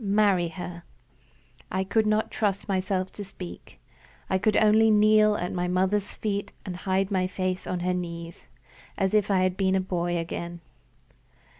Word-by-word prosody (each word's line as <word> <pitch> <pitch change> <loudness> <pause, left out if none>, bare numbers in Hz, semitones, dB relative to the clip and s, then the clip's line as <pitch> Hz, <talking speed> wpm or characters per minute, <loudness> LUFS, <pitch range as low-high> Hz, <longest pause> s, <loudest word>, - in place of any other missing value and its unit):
Marry 200 -3 +3
her." 170 0 -7 0.9
I 190 0 0
could 215 +3 +1
not 215 +1 +1
trust 200 -3 -1
myself 190 -1 -1
to 205 - -7
speak. 185 -2 -10 0.5
I 190 - +2
could 210 +2 +2
only 220 +1 +5
kneel 215 0 +5
at 175 -3 -3
my 180 0 -1
mother's 190 +3 0
feet, 200 -2 -3
and 185 -3 -5
hide 190 +2 -1
my 185 -1 +1
face 185 0 -3
on 180 -1 -2
her 180 +1 0
knees, 170 -4 -6 0.5
as 195 -1 0
if 210 -1 +3
I 190 -2 +3
had 185 -1 +1
been 190 -1 +1
a - - +3
boy 175 -2 -1
again. 170 +1 -5
190 Hz, 165 wpm, -26 LUFS, 180-205 Hz, 0.9 s, only